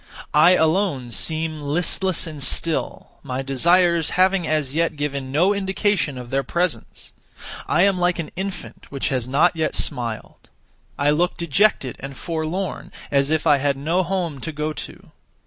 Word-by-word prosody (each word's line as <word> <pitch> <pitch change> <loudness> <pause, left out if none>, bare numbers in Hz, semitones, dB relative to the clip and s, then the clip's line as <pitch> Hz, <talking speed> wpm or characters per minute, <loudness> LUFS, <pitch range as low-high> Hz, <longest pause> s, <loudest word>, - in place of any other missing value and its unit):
I 160 +4 +6
alone 160 -7 +1
seem 155 +6 -2
listless 175 +5 +1
and 155 -3 -8
still, 165 +4 -1
my 130 +1 -4
desires 170 +4 +3
having 185 -2 +3
as 150 -4 0
yet 165 0 0
given 140 -2 -3
no 175 +8 +3
indication 195 -6 0
of 125 -1 -9
their 135 +1 +1
presence. 175 +4 -3 0.6
I 175 - +3
am 195 -2 +3
like 175 0 +2
an 165 -3 -5
infant 195 +1 -6
which 140 +1 -1
has 130 -4 -1
not 155 +7 +3
yet 160 -1 -1
smiled. 115 -3 -4 0.5
I 145 +1 +2
look 175 +4 +1
dejected 170 - +1
and 135 0 -8
forlorn, 165 +2 -4 0.2
as 140 0 +2
if 160 0 0
I 145 -3 +5
had 140 0 0
no 165 +6 0
home 175 -5 -2
to 160 - -4
go 150 +1 -3
to. - - -9
160 Hz, 160 wpm, -22 LUFS, 140-180 Hz, 0.6 s, I